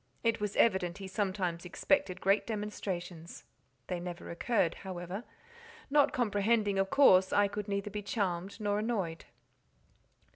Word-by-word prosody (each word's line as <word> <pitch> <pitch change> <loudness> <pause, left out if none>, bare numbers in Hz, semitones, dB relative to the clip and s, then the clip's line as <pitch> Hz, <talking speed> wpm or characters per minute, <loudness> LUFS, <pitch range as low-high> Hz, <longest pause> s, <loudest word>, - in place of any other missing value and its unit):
It 230 -2 +1
was 210 -1 -2
evident 190 -5 +2
he 195 -1 -7
sometimes 190 -4 -2
expected 185 +1 0
great 195 +2 +2
demonstrations; 185 -6 -5 0.4
they 180 - -3
never 175 0 -6
occurred, 175 0 +1
however; 185 +2 -5 0.7
not 290 0 +5
comprehending, 210 -3 +1
of 195 0 +1
course 190 -10 +6
I 205 0 +4
could 205 +1 -5
neither 200 0 -2
be 210 +1 -4
charmed 195 -2 -2
nor 205 -1 0
annoyed. 200 -8 -2
200 Hz, 135 wpm, -32 LUFS, 180-210 Hz, 0.7 s, course